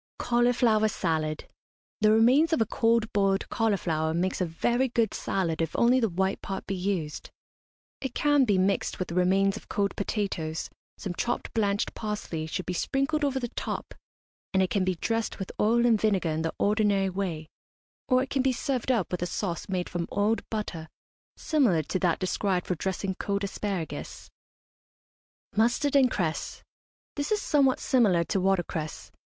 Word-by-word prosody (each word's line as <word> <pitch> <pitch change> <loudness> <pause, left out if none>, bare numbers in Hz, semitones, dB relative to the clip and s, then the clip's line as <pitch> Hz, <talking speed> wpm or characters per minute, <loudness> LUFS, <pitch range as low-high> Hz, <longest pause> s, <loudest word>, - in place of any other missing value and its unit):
CAULIFLOWER 240 -2 +3
SALAD. 155 -6 -2 0.5
The 215 -1 +4
remains 255 +9 +5
of - - +2
a 225 - +3
cold 225 0 +1
boiled 195 -1 +1
cauliflower 165 -8 0
makes 185 +2 -1
a 180 - +1
very 240 +10 0
good 230 -3 +1
salad 170 -4 -1
if 165 - -2
only 245 +2 +4
the 225 -3 +1
white 190 +2 -1
part 195 -1 -5
be 195 - -3
used. 180 -5 -3 0.7
It 265 -3 -4
can 290 -2 +4
be 205 -5 +2
mixed 190 +2 +1
with 185 - -4
remains 190 +2 +2
of - - -13
cold 200 -1 0
potatoes, 190 -6 -3 0.3
some 190 - -4
chopped 240 +7 -2
blanched 205 -2 0
parsley 205 -7 -4
should 185 +3 -4
be 180 - -3
sprinkled 275 - 0
over 270 -2 +1
the 240 -2 -3
top, - - -5 0.6
and 190 - +5
it 185 - -2
can 200 - +1
be 185 0 0
dressed 225 +6 -2
with 190 - -5
oil 235 +3 +3
and 225 -3 +3
vinegar 195 -6 +2
in 155 +1 -1
the 165 0 -2
ordinary 205 -2 +2
way; 180 -5 -3 0.6
or 255 -1 +4
it 265 - -8
can 270 - +1
be 265 0 +2
served 260 0 -1
up 225 -8 0
with 180 - -2
a 175 - 0
sauce 175 -1 -3
made 180 -2 -1
from 175 -1 -3
oiled 210 +3 +1
butter 175 -7 -4 0.5
similar 240 - +2
to 185 - -2
that 175 -3 +2
described 185 -1 -1
for - - -1
dressing 190 +2 -2
cold 200 0 -1
asparagus. 195 -4 -4 1.2
MUSTARD 240 +6 +2
AND 265 -2 +6
CRESS. 165 -8 -3 0.5
This 285 +5 -2
is 425 - +2
somewhat 280 -8 +2
similar 205 -10 +3
to 190 +3 -1
watercress. 175 -5 -1
200 Hz, 170 wpm, -27 LUFS, 180-235 Hz, 1.2 s, AND